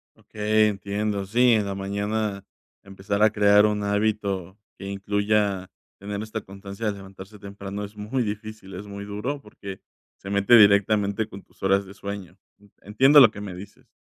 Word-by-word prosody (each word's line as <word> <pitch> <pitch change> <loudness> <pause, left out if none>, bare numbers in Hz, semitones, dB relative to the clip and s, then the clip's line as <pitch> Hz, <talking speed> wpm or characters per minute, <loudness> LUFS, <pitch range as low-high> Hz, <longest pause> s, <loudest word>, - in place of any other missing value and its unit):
Okey, 110 0 +1
entiendo, 100 0 -2
sí, 120 +5 +3
en 105 -2 +2
la 100 - -4
mañana 100 +1 -2 0.4
empezar 100 +1 -4
a 110 - +6
crear 105 0 +5
un 105 -1 0
hábito 100 -3 -1 0.2
que - - -9
incluya 100 -1 0 0.3
tener 100 +1 -5
esta 110 0 -5
constancia 100 +2 -7
de 105 - 0
levantarse 95 +1 -12
temprano 100 0 -7
es 105 +1 -13
muy 110 +5 -2
difícil, 105 -2 -7
es 95 +3 -7
muy 100 0 -7
duro, 110 +8 -4
porque 100 -3 -10 0.4
se 95 - -10
mete 100 +4 +5
directamente 100 0 +4
con 100 -1 -10
tus - - -29
horas 100 +1 +2
de 95 - -12
sueño, 100 -3 -7 0.5
entiendo 135 +8 +5
lo 120 -6 +8
que 105 - -10
me 100 -3 -6
dices. 95 +3 -12
100 Hz, 165 wpm, -24 LUFS, 100-105 Hz, 0.5 s, lo